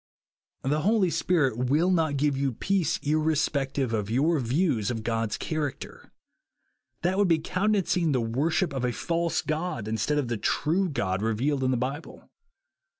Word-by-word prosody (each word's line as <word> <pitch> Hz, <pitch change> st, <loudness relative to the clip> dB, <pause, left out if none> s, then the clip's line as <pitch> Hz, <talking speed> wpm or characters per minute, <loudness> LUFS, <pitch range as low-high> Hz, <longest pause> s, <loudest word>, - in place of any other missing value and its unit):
The 150 Hz, +3 st, 0 dB
Holy 200 Hz, -1 st, +2 dB
Spirit 130 Hz, -10 st, +1 dB
will 165 Hz, +7 st, +3 dB
not 160 Hz, -5 st, +1 dB
give 145 Hz, 0 st, +1 dB
you 135 Hz, -1 st, -1 dB
peace 190 Hz, -, 0 dB
irre 155 Hz, +1 st, +2 dB
spective 135 Hz, -4 st, -1 dB
of 105 Hz, -2 st, -1 dB
your 150 Hz, +7 st, +2 dB
views 125 Hz, -, 0 dB
of 115 Hz, -2 st, -3 dB
God's 115 Hz, -1 st, -1 dB
character. 155 Hz, -4 st, -5 dB, 0.9 s
hat 185 Hz, +3 st, +1 dB
would 205 Hz, -, +4 dB
be 165 Hz, -2 st, +4 dB
countenancing 180 Hz, -1 st, 0 dB
the 130 Hz, -, +2 dB
worship 140 Hz, +9 st, 0 dB
of 130 Hz, -2 st, -3 dB
a 125 Hz, -1 st, 0 dB
false 170 Hz, +3 st, -1 dB
god 155 Hz, -, -3 dB
instead 110 Hz, +7 st, 0 dB
of 145 Hz, -4 st, 0 dB
the 120 Hz, -1 st, -2 dB
true 170 Hz, -, 0 dB
God 95 Hz, -, -1 dB
re» 110 Hz, 0 st, 0 dB
vealed 140 Hz, +4 st, 0 dB
in 130 Hz, -, +2 dB
the 130 Hz, -, +1 dB
Bible. 135 Hz, +6 st, -5 dB
145 Hz, 165 wpm, -27 LUFS, 125-165 Hz, 0.9 s, would